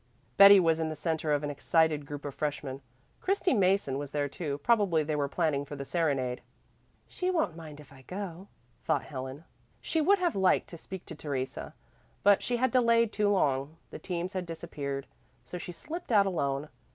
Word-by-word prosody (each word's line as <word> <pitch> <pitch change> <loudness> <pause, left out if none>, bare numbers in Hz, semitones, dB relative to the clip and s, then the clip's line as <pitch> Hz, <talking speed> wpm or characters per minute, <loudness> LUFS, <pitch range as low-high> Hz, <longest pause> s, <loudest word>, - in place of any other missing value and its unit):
Betty 200 0 +10
was 165 -2 +2
in 160 -1 -1
the 155 - -4
centre 160 0 -1
of 145 0 +1
an 145 - -2
excited 155 0 +1
group 145 0 -7
of 145 - -4
freshmen. 140 -2 -3 0.4
Christy 385 -2 +1
Mason 190 - +2
was 145 -1 -5
there 145 0 -1
too; 145 -1 -4
probably 200 -9 +3
they 150 0 -2
were 145 -1 0
planning 155 -3 0
for 145 +1 -8
the 140 -1 -6
serenade. 135 -7 0 0.7
"She 365 - -2
won't 320 - 0
mind 155 -3 -10
if 145 -2 -14
I 130 - -15
go," 185 +3 -7 0.4
thought - - +1
Helen. 130 +2 -7 0.4
She 320 - -1
would 400 +6 +5
have 355 -3 0
liked 190 -1 +2
to 170 - -9
speak 190 +1 -8
to - - -8
Theresa, 140 -4 -5 0.5
but 205 -1 +5
she 245 - -1
had 260 +2 +1
delayed 230 -3 +3
too 210 -1 +2
long; 145 -5 +1
the - - -7
teams 180 +1 -4
had 185 -2 -3
disappeared. 145 -5 -5 0.4
So 180 - -6
she 175 - -6
slipped 310 - -7
out 205 -3 +5
alone. 145 -5 -1
160 Hz, 190 wpm, -29 LUFS, 145-200 Hz, 0.7 s, Betty